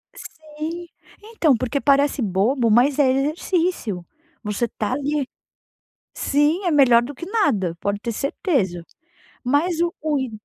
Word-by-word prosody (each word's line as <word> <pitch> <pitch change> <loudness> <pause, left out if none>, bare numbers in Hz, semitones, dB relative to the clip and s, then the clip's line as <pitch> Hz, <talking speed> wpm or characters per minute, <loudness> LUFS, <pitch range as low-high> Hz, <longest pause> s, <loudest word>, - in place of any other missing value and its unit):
Sim, 315 +3 -8 0.4
então, 385 - +2
porque 255 +4 -2
parece 280 -1 +2
bobo, 225 +5 +1
mas 260 +6 +3
é 265 -2 +5
exercício, 295 - -1 0.4
você 210 +2 -1
tá 215 +1 -3
ali. 285 0 -1 0.9
Sim, 295 +7 +1
é 350 - +2
melhor 255 -6 +5
do 275 +4 -6
que 340 - -8
nada, 275 - 0
pode 200 0 -1
ter 235 +1 -3
certeza, 220 - -1 0.6
mas 315 +6 +1
o 340 0 0
o 300 -2 +1
i 260 - -3
280 Hz, 140 wpm, -22 LUFS, 235-315 Hz, 0.9 s, é